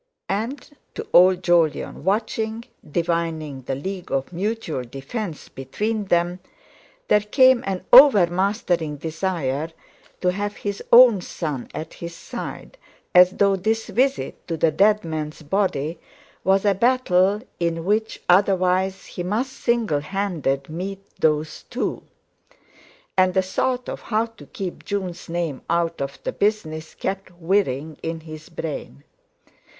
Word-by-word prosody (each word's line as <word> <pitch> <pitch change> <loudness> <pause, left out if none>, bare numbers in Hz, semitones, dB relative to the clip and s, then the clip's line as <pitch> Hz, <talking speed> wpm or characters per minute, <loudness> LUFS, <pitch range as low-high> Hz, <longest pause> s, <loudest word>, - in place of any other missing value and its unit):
And 230 +8 -3 0.3
to - - -5
old 185 +1 +6
Jolyon 170 -3 +1
watching, 220 +3 -1 0.3
divining 165 -4 -2
the 130 +1 -3
league 185 +6 -6
of 135 +6 -2
mutual 195 - -2
defence 145 - -6
between 210 - -3
them, 175 0 +1 0.7
there 210 - +5
came 255 +4 +4
an 190 -2 -3
overmastering 185 - +5
desire 160 -2 -2 0.5
to 180 - +3
have 205 +2 -3
his 200 -1 -4
own 235 -5 +8
son 150 -7 -5
at 160 - -6
his 170 0 -8
side, - - -8 0.3
as 180 0 +8
though 200 -1 +3
this 220 +4 -1
visit 265 +3 -1
to 165 -2 -2
the 160 +1 +3
dead 210 +5 +3
man's 155 -1 -5
body 160 -2 -1 0.4
was 195 +1 +3
a 200 - +5
battle 205 -3 +2 0.2
in 165 -1 -1
which 215 +3 0
otherwise 185 0 +2
he - - -7
must 215 +9 -1
single 235 - 0
handed 150 -6 -2
meet 195 +4 -6
those 155 0 +1
two. - - -2 1.1
And 185 -1 +3
the 190 - +3
thought 250 +7 -1
of - - -5
how 220 0 0
to 225 -2 -15
keep 195 -8 -6
Jun's 185 -5 -4
name 165 -6 -2
out 170 -1 0
of 140 0 -4
the - - -2
business 160 -7 -2
kept 195 0 -4
whirring 160 -5 0
in 165 0 -4
his 155 +1 -10
brain. 155 - -6
185 Hz, 135 wpm, -23 LUFS, 160-205 Hz, 1.1 s, own